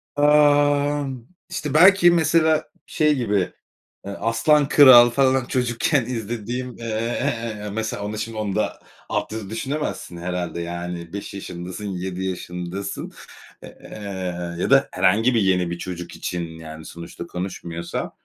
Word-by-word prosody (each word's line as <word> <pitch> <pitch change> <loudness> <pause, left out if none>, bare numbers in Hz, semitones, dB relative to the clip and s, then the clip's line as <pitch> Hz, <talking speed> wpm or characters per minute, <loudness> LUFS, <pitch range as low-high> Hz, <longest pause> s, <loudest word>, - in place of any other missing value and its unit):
Aaa, 145 0 +4 0.4
işte 155 -5 -4
belki 175 +1 +7
mesela 160 -1 +3 0.2
şey 150 -2 +2
gibi, 110 -6 +1 0.7
eee, 100 - -5
Aslan 115 +6 +3
Kral 125 -5 +9
falan 130 0 +2
çocukken 125 +2 0
izlediğim, 120 +1 -4
eee, 115 - -8 0.7
eee, 105 0 -6
mesela 110 -2 -3
onu 105 +1 -4
şimdi 110 0 -5
onu 105 -3 -2
da - - -1 0.3
altyazı 110 -2 -3
düşünemezsin 130 - -4
herhâlde, 85 -1 -3
yani 85 0 -6
5 100 0 -6
yaşındasın, 90 +1 -7
7 95 0 -4
yaşındasın, 90 +1 -5 0.5
eee, - - -9 0.9
ya - - -1
da 140 0 +5
herhangi 100 +7 +3
bir 115 - +3
yeni 90 -3 +2
bir 85 - -3
çocuk 90 -1 -7
için, 90 - -4 0.2
yani, 80 0 -10
sonuçta 85 0 -9
konuşmuyorsa. 85 -2 -5
110 Hz, 130 wpm, -22 LUFS, 90-140 Hz, 0.9 s, Kral